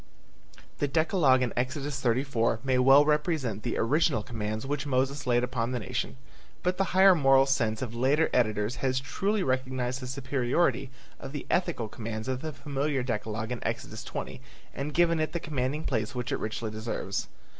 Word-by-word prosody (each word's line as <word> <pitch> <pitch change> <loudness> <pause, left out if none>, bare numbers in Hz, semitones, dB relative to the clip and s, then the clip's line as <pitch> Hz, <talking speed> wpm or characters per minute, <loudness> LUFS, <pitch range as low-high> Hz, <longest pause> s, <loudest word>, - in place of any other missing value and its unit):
The 145 - +1
decalogue 150 -3 +3
in 125 - -1
Exodus 135 +2 -2
34 120 -2 +1
may 130 -1 +2
well 135 +3 +7
represent 150 - 0
the 120 - -2
original 145 -1 +2
commands 110 -1 -4
which 145 +1 -2
Moses 135 +1 0
laid 120 0 +3
upon 125 -1 -1
the 125 - -1
nation, 70 - -3 0.5
but 180 0 0
the 195 - +2
higher 190 0 +8
moral 135 -4 +5
sense 115 -4 0
of 120 -3 -5
later 135 +7 +2
editors 110 0 +1
has 130 -1 0
truly 195 +9 -1
recognized 130 -1 -1
the 130 - -6
superiority 135 +2 0 0.3
of 135 0 -8
the 145 - -5
ethical 175 -11 0
commands 110 +1 -6
of 130 0 -2
the 155 0 -4
familiar 140 -2 -2
decalogue 110 -1 -3
in 125 - -4
Exodus - - -4
20 - - -6 0.3
and 145 +2 -4
given 170 -1 +3
it 155 - -1
the 170 - -1
commanding 150 -1 -2
place 110 -5 -2
which 125 -1 -3
it - - +1
richly 110 0 -3
deserves. 110 +2 -3
130 Hz, 175 wpm, -28 LUFS, 120-145 Hz, 0.5 s, higher